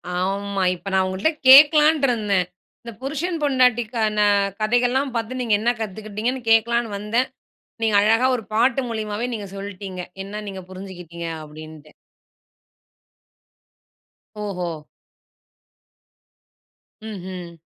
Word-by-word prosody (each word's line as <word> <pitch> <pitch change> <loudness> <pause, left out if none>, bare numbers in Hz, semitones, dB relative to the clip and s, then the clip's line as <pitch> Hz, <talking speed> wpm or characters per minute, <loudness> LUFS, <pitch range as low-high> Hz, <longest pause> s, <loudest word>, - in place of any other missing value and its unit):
ஆமா 195 +2 -1
இப்ப 190 +3 -8
நான் 190 0 +3
உங்கட்ட 190 +11 0 0.2
கேட்கலான்னு 300 +2 +8
இருந்தேன். 205 -6 +1 0.4
இந்த 235 - -7
புருஷன், 310 +6 -2
பொண்டாட்டிக்கான 240 -5 +2 0.4
கதைகள்லாம் 245 +4 +1
பாத்து 230 +3 -3
நீங்க 230 -3 0
என்ன 235 +3 +1
கத்துக்கிட்டீங்கன்னு 220 +4 -4
கேட்கலான்னு 230 0 +2
வந்தேன். 225 +5 0 0.6
நீங்க 220 -2 +2
அழகா 225 +4 +3
ஒரு 225 - -7
பாட்டு 245 +4 +3
மூலியமாவே 220 0 -3
நீங்க 210 -3 -5
சொல்லிட்டீங்க 195 -2 -7 0.2
என்ன 210 +2 -6
நீங்க 190 -1 -6
புரிஞ்சுக்கிட்டிங்க 180 -3 -8
அப்படின்ட்டு. 155 0 -12 2.6
ஓஹோ! 180 -4 -3 2.4
ம்ஹ்ம். 180 -4 -8
215 Hz, 100 wpm, -22 LUFS, 190-245 Hz, 2.6 s, கேட்கலான்னு